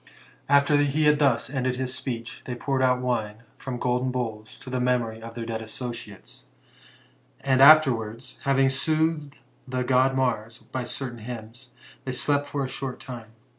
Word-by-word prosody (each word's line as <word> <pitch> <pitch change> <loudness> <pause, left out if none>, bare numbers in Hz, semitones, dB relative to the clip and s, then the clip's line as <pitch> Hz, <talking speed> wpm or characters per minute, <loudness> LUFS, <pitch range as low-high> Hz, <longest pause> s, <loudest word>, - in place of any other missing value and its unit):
After 145 +1 +5
he 145 +2 +2
had 150 0 +4
thus 135 -5 +3
ended 130 -2 -1
his 130 0 -2
speech, 115 -4 -4
they 125 - -4
poured 135 +2 -1
out 125 -1 +3
wine 115 -3 -2
from 130 -2 -5
golden 125 +1 0
bowls, 110 -4 -4
to 130 -1 -9
the 130 - -1
memory 120 -3 0
of 115 0 -9
their 115 -1 -4
dead 115 -1 -4
associates; 110 -2 -7 1.0
and 135 -1 +2
afterwards, 130 -5 +5
having 135 -1 +4
soothed 155 +1 0 0.3
the 130 0 -1
god 130 +1 +3
Mars 115 -4 -1
by 130 -1 -3
certain 120 -1 -5
hymns, 120 +2 -9 0.3
they 130 - -4
slept 145 +2 0
for 140 -2 -2
a - - -3
short 130 -1 -5
time. 115 -4 -9
125 Hz, 165 wpm, -26 LUFS, 115-135 Hz, 1.0 s, After